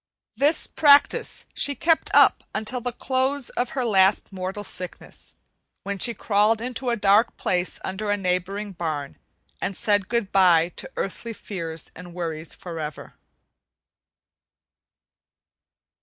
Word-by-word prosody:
This 290 +7 +3
practice 290 -2 +4
she 285 - +1
kept 325 +5 +2
up - - +5
until 220 +4 -2
at 240 - -16
the 245 - 0
close 260 +2 -1
of 245 0 -1
her 255 - +1
last 195 -3 +3
mortal 190 +2 -4
sickness, 180 -2 -7 0.5
when 200 0 -4
she 235 +2 +1
crawled 210 +2 +2
into 250 +1 -3
a 235 - +2
dark 205 +2 +3
place 180 0 -1
under 205 +3 -3
a 205 - +2
neighboring 195 +2 -2
barn 155 -6 -4 0.4
and 195 - -3
said 205 -2 +1
good 235 -4 -1
by 175 -3 +5
to 180 - -9
earthly 230 +4 -4
fears 165 -7 -6
and 175 0 -11
worries 165 -2 -5
forever. 160 -4 -7
200 Hz, 130 wpm, -24 LUFS, 180-235 Hz, 0.5 s, up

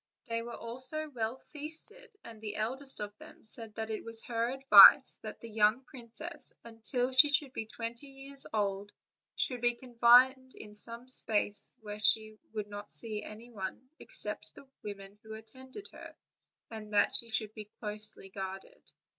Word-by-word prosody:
They 230 -1 -3
were 235 0 -8
also 260 +7 -1
well 230 -1 -3
feasted; 320 - -2
and 225 -2 -12
the 210 -1 -6
eld 230 +6 -3
est 275 -1 +5
of 205 0 -15
them - - -15
said 220 -1 -3
that 220 0 -5
it 215 - -5
was 225 0 +3
her 230 0 -1
advice 270 +1 +8
that - - -9
the 230 - -9
young 215 +4 +2
princess, 240 -4 -4
until 235 +3 -3
she 265 +3 +6
should 285 -3 +1
be 220 - -5
twenty 235 +4 -7
years 275 0 -5
old, 205 -1 -2 0.4
should 250 -4 -1
be 240 0 +1
confined 255 +2 +3
in 210 -1 -12
some 230 +3 0 0.2
place 205 -1 0
where 210 -1 -8
she 215 0 +1
would 210 -2 -5 0.2
see 215 -2 -3
no - - -10 0.3
one 200 +5 -7
but - - -14 0.5
the 275 - -15
women 200 0 -10
who 220 0 -10
attended 260 - -12
on - - -13
her, - - -12 0.6
and 215 -1 -9
that 205 - +3
she 235 - +5
should 220 -1 -2
be 215 -1 -9
closely 210 -2 -3
guarded. 190 0 -8
230 Hz, 170 wpm, -31 LUFS, 215-260 Hz, 0.6 s, advice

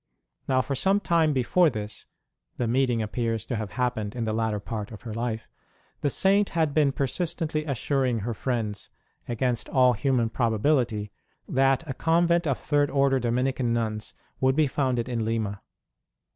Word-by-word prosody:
Now, 130 -1 +2
for 140 - -3
some 195 +9 +2
time 165 -5 +2
before 145 +6 +3
this 105 -3 -6 0.5
(the 120 - 0
meeting 120 -1 +1
appears 115 0 -2
to 125 - -3
have 105 -4 -4
happened 120 -3 -2
in 120 - -2
the 110 -1 -1
latter 110 -1 0
part 105 0 -5
of 110 - -11
her 115 -3 -6
life) 115 -1 -3 0.5
the 145 - +1
Saint 195 +7 +3
had 160 -3 +2
been 145 -2 +3
persistently 155 +2 -2
assuring 130 -3 0
her 115 +3 -2
friends, 110 -4 -3 0.4
against 120 0 -1
all 125 -2 +4
human 120 0 +1
probability, 115 -2 +1 0.4
that 135 +3 +2
a 135 - -3
convent 170 +3 +2
of 135 - +1
Third 145 0 +1
Order 135 -1 +2
Dominican 125 0 0
nuns 110 -2 -2 0.2
would 130 0 +3
be 155 0 +4
founded 130 -4 0
in 120 -3 -1
Lima. 110 -3 -2
125 Hz, 160 wpm, -26 LUFS, 115-140 Hz, 0.5 s, all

